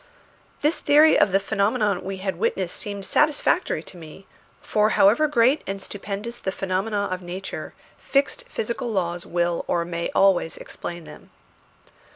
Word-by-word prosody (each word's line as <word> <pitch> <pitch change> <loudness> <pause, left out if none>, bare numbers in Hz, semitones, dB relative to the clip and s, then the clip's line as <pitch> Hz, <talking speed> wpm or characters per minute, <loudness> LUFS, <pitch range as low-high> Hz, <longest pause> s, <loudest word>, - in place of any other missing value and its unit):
This 300 +3 +1
theory 300 +2 +6
of 200 - +4
the 195 - +4
phenomena 205 0 0
we 195 0 -5
had 190 0 -3
witnessed 465 +1 -1
seemed 200 -3 -4
satisfactory 305 - +1
to 180 - -12
me; 165 +3 -12 0.3
for 215 0 +1
however 230 +11 +5
great 270 +1 +3
and 195 +1 -3
stupendous 205 +4 -6
the 190 - -2
phenomena 195 +2 -1
of 185 0 -3
nature, 185 +2 -7 0.2
fixed 280 - 0
physical 250 - -3
laws 175 -4 -2
will 175 0 0
or 170 -1 0
may 170 0 -3
always 190 -4 +3
explain 175 -1 -7
them. - - -13
200 Hz, 150 wpm, -24 LUFS, 185-235 Hz, 0.3 s, theory